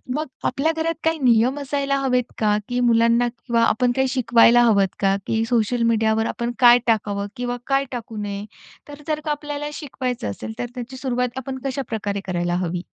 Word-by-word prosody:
मग 305 Hz, +1 st, -1 dB, 0.2 s
आपल्या 310 Hz, +4 st, +1 dB
घरात 330 Hz, +1 st, 0 dB
काही 320 Hz, 0 st, +1 dB
नियम 250 Hz, +1 st, +3 dB
असायला 280 Hz, 0 st, -1 dB
हवे 250 Hz, -2 st, +1 dB
का? 210 Hz, -1 st, +2 dB
की 245 Hz, 0 st, -1 dB
मुलांना 235 Hz, 0 st, +3 dB
किंवा 235 Hz, 0 st, -2 dB
आपण 245 Hz, +2 st, +2 dB
काही 265 Hz, 0 st, +2 dB
शिकवायला 240 Hz, -2 st, +5 dB
हवं 200 Hz, -5 st, +3 dB
का? 195 Hz, -1 st, +2 dB
की 225 Hz, 0 st, +1 dB
सोशल 235 Hz, 0 st, +1 dB
मीडियावर 220 Hz, 0 st, +2 dB
आपण 235 Hz, +1 st, -2 dB
काय 245 Hz, -1 st, +7 dB
टाकावं 205 Hz, -2 st, 0 dB
किंवा 245 Hz, -1 st, -3 dB
काय 275 Hz, 0 st, +2 dB
टाकू 230 Hz, -3 st, -6 dB
नये? 200 Hz, 0 st, -4 dB, 0.4 s
तर 290 Hz, 0 st, -10 dB
जर 305 Hz, -1 st, 0 dB
का 305 Hz, -, 0 dB
आपल्याला 295 Hz, 0 st, -4 dB
शिकवायचं 255 Hz, -, -4 dB
असेल, 110 Hz, +2 st, -7 dB
तर -, -, -1 dB
त्याची 250 Hz, +1 st, -7 dB
सुरुवात 250 Hz, -1 st, -2 dB
आपण 265 Hz, 0 st, -5 dB
कशाप्रकारे 220 Hz, -7 st, -3 dB
करायला 175 Hz, -1 st, -1 dB
हवी? 175 Hz, +1 st, -3 dB
245 Hz, 180 wpm, -22 LUFS, 220-270 Hz, 0.4 s, काय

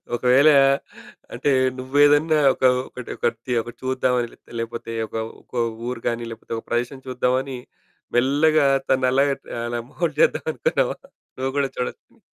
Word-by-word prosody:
ఒకవేళ 130 Hz, +5 st, +5 dB, 0.8 s
అంటే 145 Hz, -, 0 dB, 0.3 s
నువ్వేదన్నా 145 Hz, +4 st, +4 dB, 0.2 s
ఒక -, -, -9 dB, 0.2 s
ఒకటి 125 Hz, -, -9 dB
ఒకటిది 120 Hz, +2 st, -2 dB
ఒకటి 120 Hz, +1 st, -10 dB
చూద్దామని 125 Hz, -2 st, 0 dB
లే -, -, -18 dB, 0.2 s
లేకపోతే 115 Hz, 0 st, -5 dB, 0.2 s
ఒక -, -, -11 dB, 0.3 s
ఒక -, -, -15 dB, 0.3 s
ఊరు 125 Hz, -2 st, -4 dB
గాని 115 Hz, 0 st, -2 dB
లేకపోతే 115 Hz, +1 st, -8 dB
ఒక -, -, -8 dB
ప్రదేశం 120 Hz, +3 st, -2 dB
చూద్దామని 130 Hz, +1 st, -1 dB, 0.6 s
మెల్లగా 145 Hz, +4 st, +3 dB, 0.2 s
తనలాగా 130 Hz, +2 st, +3 dB, 0.3 s
అలా 120 Hz, 0 st, -3 dB
మోల్ద్ 155 Hz, -2 st, -3 dB
జేద్దామనుకున్నావా? 160 Hz, -, +1 dB, 0.4 s
నువ్వు 130 Hz, +1 st, -1 dB
గూడా 140 Hz, -1 st, +1 dB
చూడొచ్చని. 125 Hz, -, -6 dB
130 Hz, 125 wpm, -22 LUFS, 120-140 Hz, 0.8 s, ఒకవేళ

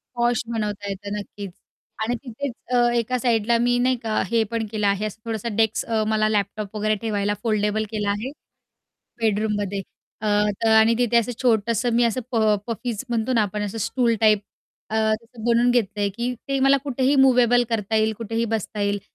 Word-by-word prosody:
Posh 240 Hz, -1 st, +1 dB
बनवता 210 Hz, -3 st, -3 dB
येतं 200 Hz, +1 st, -5 dB
नक्कीच, 200 Hz, -2 st, -7 dB, 0.5 s
आणि 240 Hz, +2 st, 0 dB
तिथेच 255 Hz, +2 st, -5 dB, 0.2 s
अ, 240 Hz, 0 st, +4 dB
एका 240 Hz, +2 st, 0 dB
साइडला 230 Hz, -1 st, +2 dB
मी 245 Hz, +1 st, +2 dB
नाही 255 Hz, +1 st, +2 dB
का, 220 Hz, -1 st, 0 dB
हे 230 Hz, -1 st, +2 dB
पण 225 Hz, -1 st, -1 dB
केलं 210 Hz, -2 st, 0 dB
आहे. 200 Hz, +2 st, +1 dB
असं 215 Hz, +1 st, -6 dB
थोडासा 225 Hz, 0 st, -3 dB
डेस्क 220 Hz, 0 st, +1 dB
अ, 220 Hz, -1 st, +1 dB
मला 215 Hz, 0 st, +2 dB
लॅपटॉप 210 Hz, 0 st, -2 dB
वगैरे 215 Hz, 0 st, +1 dB
ठेवायला 205 Hz, -2 st, 0 dB
फोल्डेबल 215 Hz, -1 st, +1 dB
केला 210 Hz, -2 st, -1 dB
आहे. 220 Hz, +7 st, -3 dB, 0.9 s
बेडरूममध्ये 205 Hz, -2 st, 0 dB, 0.4 s
अ, 215 Hz, -, -2 dB, 0.4 s
तर, -, -, +3 dB
आणि 220 Hz, +1 st, +6 dB
तिथे 240 Hz, -1 st, +2 dB
असं 235 Hz, +1 st, +1 dB
छोटंसं 230 Hz, 0 st, +1 dB
मी 240 Hz, -, +4 dB
असं 235 Hz, +2 st, 0 dB
प -, -, -3 dB, 0.3 s
पफीज 230 Hz, -1 st, -3 dB
म्हणतो 235 Hz, +2 st, 0 dB
ना 225 Hz, -, +3 dB
आपण, 210 Hz, 0 st, -2 dB
असं 205 Hz, +3 st, -5 dB
स्टूल 235 Hz, +2 st, +1 dB
टाईप 215 Hz, -1 st, +5 dB, 0.5 s
अ, 220 Hz, -, -3 dB
असं 220 Hz, +1 st, -1 dB
बनवून 240 Hz, +1 st, +3 dB
घेतलंय, 205 Hz, -4 st, 0 dB
की 235 Hz, +5 st, -3 dB
ते 275 Hz, -1 st, 0 dB
मला 275 Hz, +1 st, +5 dB
कुठेही 270 Hz, 0 st, +1 dB
मूव्हेबल 245 Hz, -2 st, +5 dB
करता 220 Hz, -1 st, -1 dB
येईल, 220 Hz, 0 st, +2 dB
कुठेही 230 Hz, +1 st, -2 dB
बसता 210 Hz, 0 st, -4 dB
येईल. 200 Hz, 0 st, 0 dB
220 Hz, 180 wpm, -23 LUFS, 210-240 Hz, 0.9 s, आणि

